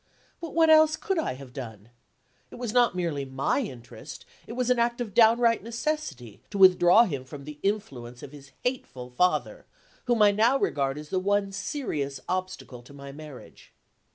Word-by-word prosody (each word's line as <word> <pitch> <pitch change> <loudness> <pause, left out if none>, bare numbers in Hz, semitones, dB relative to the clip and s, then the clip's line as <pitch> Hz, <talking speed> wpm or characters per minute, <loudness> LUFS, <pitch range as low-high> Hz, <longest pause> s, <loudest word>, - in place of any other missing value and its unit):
But 335 -2 -8
what 325 -1 +5
else 315 0 +6
could 385 +2 -2
I 315 - -2
have 130 -2 -12
done? 115 -5 -9 0.6
It - - -12
was 240 -3 -5
not 240 -6 +3
merely 165 -6 -2
my 135 - -1
interest, 120 - -8 0.2
it - - -7
was 250 0 0
an 250 - +2
act 235 +1 +1
of 225 -5 -4
downright 230 +1 +4
necessity, 230 - -4
to 200 - -5
withdraw 185 +2 +7
him 140 - -3
from 140 +2 -10
the 150 +1 -10
influence 130 - -4
of 135 - -9
his 140 -2 -14
hateful 130 - -4
father 180 +9 0 0.4
whom 240 -3 +3
I 205 - +6
now 225 +6 +3
regard 135 - -1
as 150 0 -9
the 185 - 0
one 200 +1 0
serious 155 - -4
obstacle 185 -9 -4
to 140 +4 -16
my 140 0 -9
marriage. 150 -2 -13
185 Hz, 180 wpm, -26 LUFS, -, 0.6 s, withdraw